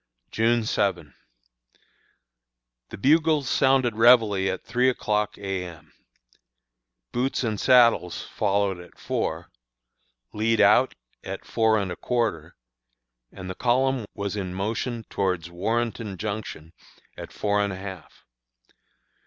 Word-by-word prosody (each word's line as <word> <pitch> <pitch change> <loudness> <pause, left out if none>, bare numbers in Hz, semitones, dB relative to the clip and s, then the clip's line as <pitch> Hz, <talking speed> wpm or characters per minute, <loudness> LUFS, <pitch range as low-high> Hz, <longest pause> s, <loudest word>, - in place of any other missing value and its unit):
June 115 +1 +2
7. 90 -10 -1 1.8
The - - -8
bugles 155 +3 +3
sounded 130 -2 +2
réveille 110 -4 +4
at - - -6
three 125 +1 +2
o'clock 105 -4 -1
A. 95 -2 -3
M. 85 -3 -12 1.2
"Boots 130 +2 -1
and 110 -4 -2
saddles" 120 -8 +4
followed 100 -2 0
at 90 - -14
four; - - -3 0.8
"lead 110 +1 +1
out" - - +4 0.3
at - - -7
four 110 -1 +2
and 100 -3 -2
a - - -4
quarter, 110 -11 -2 0.8
and 95 -1 -9
the 95 - -4
column 130 +2 +1
was 100 0 -3
in 95 -3 -4
motion 115 +4 -3
towards 90 -4 -2
Warrenton 110 +2 -2
Junction 100 -6 -6 0.4
at - - -9
four 105 0 0
and 100 - -1
a 95 - -6
half. 95 -3 -10
105 Hz, 120 wpm, -25 LUFS, 95-120 Hz, 1.8 s, réveille